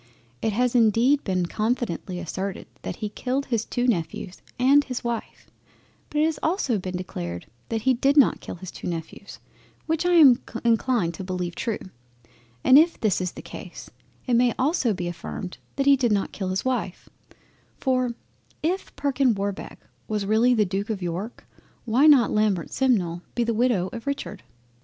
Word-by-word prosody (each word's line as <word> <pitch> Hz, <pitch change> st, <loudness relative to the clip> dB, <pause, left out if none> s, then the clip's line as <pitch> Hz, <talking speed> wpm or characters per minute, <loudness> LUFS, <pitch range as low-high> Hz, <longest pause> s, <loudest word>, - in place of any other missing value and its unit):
It 220 Hz, -, +1 dB
has 245 Hz, +3 st, +1 dB
indeed 240 Hz, +4 st, +4 dB
been 185 Hz, -3 st, 0 dB
confidently 215 Hz, -3 st, -2 dB
asserted 185 Hz, +2 st, -4 dB, 0.2 s
that -, -, -5 dB
he 210 Hz, -, -4 dB
killed 260 Hz, +6 st, -2 dB
his 230 Hz, -3 st, -1 dB
two 245 Hz, -, -1 dB
Nephews 180 Hz, -4 st, -2 dB, 0.2 s
and 275 Hz, +3 st, +5 dB
his 255 Hz, -3 st, -5 dB
Wife, 235 Hz, -2 st, -5 dB, 0.6 s
but 300 Hz, -, 0 dB
it -, -, +4 dB
has 320 Hz, -1 st, -1 dB
also 315 Hz, -, 0 dB
been 185 Hz, 0 st, -4 dB
declared 85 Hz, -, -5 dB, 0.2 s
that 225 Hz, -1 st, -2 dB
he 260 Hz, -, +4 dB
did 275 Hz, +4 st, +2 dB
not 280 Hz, -, +5 dB
kill -, -, -7 dB
his 185 Hz, +1 st, -9 dB
two -, -, -7 dB
Nephews, 170 Hz, +3 st, -6 dB, 0.5 s
which 320 Hz, 0 st, 0 dB
I 355 Hz, 0 st, +2 dB
am 280 Hz, -8 st, +7 dB, 0.2 s
inclined 230 Hz, -6 st, +2 dB
to 180 Hz, -, -7 dB
beleive 180 Hz, -2 st, -3 dB
true; 225 Hz, +3 st, -2 dB, 0.9 s
and 265 Hz, +2 st, +8 dB
if 330 Hz, +2 st, +2 dB
this 205 Hz, -4 st, +1 dB
is 180 Hz, -1 st, -2 dB
the -, -, -10 dB
case, -, -, -10 dB, 0.3 s
it 250 Hz, -, 0 dB
may 240 Hz, 0 st, +3 dB
also 265 Hz, -2 st, +1 dB
be 180 Hz, -3 st, -3 dB
affirmed 175 Hz, +2 st, -6 dB, 0.2 s
that 275 Hz, -, 0 dB
he 280 Hz, 0 st, +7 dB
did 250 Hz, -4 st, +1 dB
not 200 Hz, -2 st, 0 dB
kill 190 Hz, -, -4 dB
his 190 Hz, +4 st, -2 dB
Wife, 245 Hz, -8 st, -2 dB, 0.7 s
for 255 Hz, -3 st, 0 dB, 0.5 s
if 360 Hz, +5 st, -2 dB
Perkin 275 Hz, -4 st, +1 dB
Warbeck 200 Hz, 0 st, -4 dB, 0.3 s
was 210 Hz, -2 st, -2 dB
really 225 Hz, +4 st, +4 dB
the 215 Hz, -2 st, +3 dB
Duke 195 Hz, +3 st, -3 dB
of 200 Hz, -4 st, -3 dB
York, 180 Hz, +7 st, -5 dB, 0.4 s
why 250 Hz, +6 st, +4 dB
might -, -, +9 dB
not 265 Hz, -6 st, +6 dB
Lambert 210 Hz, -6 st, +1 dB
Simnel 185 Hz, -11 st, +1 dB
be 240 Hz, -, +2 dB
the 230 Hz, 0 st, 0 dB
Widow 225 Hz, -5 st, +2 dB
of 235 Hz, +2 st, -8 dB
Richard. 280 Hz, -8 st, -4 dB
230 Hz, 180 wpm, -25 LUFS, 190-260 Hz, 0.9 s, might